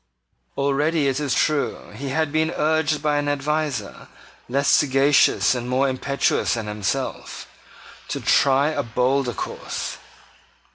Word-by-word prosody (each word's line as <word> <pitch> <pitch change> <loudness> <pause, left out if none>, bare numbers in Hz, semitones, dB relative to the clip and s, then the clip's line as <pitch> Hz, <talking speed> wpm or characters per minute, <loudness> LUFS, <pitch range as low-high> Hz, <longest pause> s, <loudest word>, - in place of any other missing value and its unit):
Already, 145 +2 +1
it 135 +1 0
is 140 -4 -1
true, 150 -2 -1
he 140 +1 -6
had 155 +2 0
been 160 +1 +1
urged 155 -1 +1
by 150 -1 +1
an 145 0 -1
adviser, 145 -5 -2 0.4
less 140 +3 0
sagacious 140 0 +4
and 125 -1 -4
more 130 +2 +2
impetuous 135 -1 0
than 115 -2 -4
himself, 105 -2 -4 0.6
to - - -3
try 140 +1 +3
a 155 -2 -1
bolder 125 +1 0
course. - - -5
140 Hz, 130 wpm, -22 LUFS, 130-150 Hz, 0.6 s, sagacious